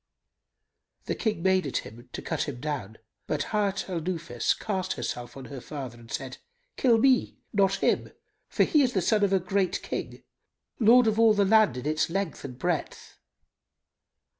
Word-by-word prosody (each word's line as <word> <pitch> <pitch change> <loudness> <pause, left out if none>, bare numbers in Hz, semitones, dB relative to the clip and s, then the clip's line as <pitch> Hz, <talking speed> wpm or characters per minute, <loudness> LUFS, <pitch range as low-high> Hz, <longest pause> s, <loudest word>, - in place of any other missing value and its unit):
The - - -1
King 215 -7 -2
made 190 -4 +3
at 135 - -1
him, 120 +4 -12
to - - -6
cut - - -2
him 125 -4 -7
down, 130 -8 -4 0.3
but 145 -1 -2
Hayat 200 -2 0
al 175 -3 -3
Nufus 160 -9 -1
cast 190 -3 -2
herself 120 +1 -5
on 135 - -8
her 135 -3 -8
father 130 -5 -7
and 115 -1 -15
said, 135 -2 -5 0.4
"Kill 240 -3 +4
me 260 +2 +3 0.2
not 195 -1 +3
him; - - +1 0.4
for - - +3
he 300 - +3
is 255 -2 +2
the 190 - +1
son 210 +3 +2
of 200 - +2
a 195 - +4
great 185 +1 -1
King, - - -5 0.6
lord 240 +2 +6
of 220 0 +1
all 225 -2 +6
the 200 -1 +3
land 215 - +4
in 125 - -6
its 155 +2 +1
length 195 -1 -3
and 125 -3 -7
breadth." 175 +1 -3
185 Hz, 180 wpm, -27 LUFS, 135-210 Hz, 0.6 s, lord